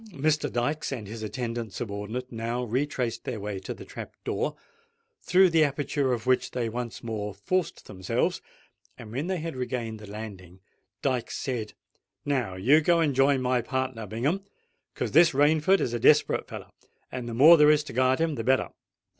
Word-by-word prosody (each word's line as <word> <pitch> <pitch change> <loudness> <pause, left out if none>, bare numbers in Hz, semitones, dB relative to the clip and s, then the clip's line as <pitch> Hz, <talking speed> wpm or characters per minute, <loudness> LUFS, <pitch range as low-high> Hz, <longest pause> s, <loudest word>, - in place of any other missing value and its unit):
Mr. 155 +1 0
Dykes 145 +7 -1
and 120 -6 -4
his 110 +2 -7
attendant 115 0 -4
subordinate 110 +3 -5
now 115 +2 -3
retraced 125 0 -2
their 120 -4 -4
way 100 -1 -4
to 95 - -7
the - - -8
trap - - -9
door, - - -2 0.7
through 190 +1 +5
the 165 -1 +5
aperture 140 -1 0
of 120 -2 -2
which 130 0 +2
they 120 -2 -2
once 120 0 -5
more 105 -3 -4
forced 180 - -2
themselves; 95 -2 -1 0.6
and 110 -2 -10
when 140 +8 -3
they 190 -1 -1
had 165 -2 -5
regained 120 -3 -4
the 105 -1 -11
landing 100 -4 -9 0.4
Dykes 130 -4 -1
said, 120 -6 -3 0.5
"Now 130 -10 -1
you 130 +12 +4
go 170 +2 +3
and 155 -4 +2
join 135 0 +3
my 125 -1 +2
partner 130 -3 -3
Bingham, 140 - -1 0.5
'cos - - -2
this 165 +1 +6
Rainford 155 +6 +4
is 120 - -1
a 120 - -1
desperate 150 +6 +4
feller, - - -9 0.4
and 125 -2 -5
the 115 - -5
more 155 +8 +9
there 150 -2 +6
is 150 0 +4
to - - -9
guard 130 +1 +3
him 160 -1 0
the 115 -5 -4
better." 130 +3 +2
125 Hz, 180 wpm, -27 LUFS, 115-145 Hz, 0.7 s, more